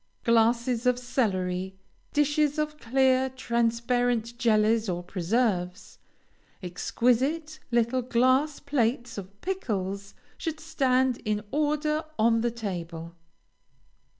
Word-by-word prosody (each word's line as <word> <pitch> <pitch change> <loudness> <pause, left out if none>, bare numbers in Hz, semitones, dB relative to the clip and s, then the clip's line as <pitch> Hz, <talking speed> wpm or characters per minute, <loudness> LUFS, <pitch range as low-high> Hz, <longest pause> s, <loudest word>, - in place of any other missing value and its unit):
Glasses 235 +1 +2
of 250 -1 +3
celery, 190 -7 -1 0.3
dishes 295 0 +2
of 300 0 -2
clear, 260 +2 +2
transparent 235 -1 0
jellies 220 -2 +3
or 175 0 -2
preserves, 180 0 -1 0.6
exquisite 255 - 0
little 240 +1 +1
glass 255 +5 +2
plates 245 -5 -1
of 200 +1 -11
pickles 200 - -3 0.2
should 320 -2 -3
stand 260 -5 +1
in 210 -1 -1
order 300 +1 0
on 230 +1 +3
the 240 - +1
table. 170 -7 -6
235 Hz, 95 wpm, -27 LUFS, 210-265 Hz, 0.6 s, of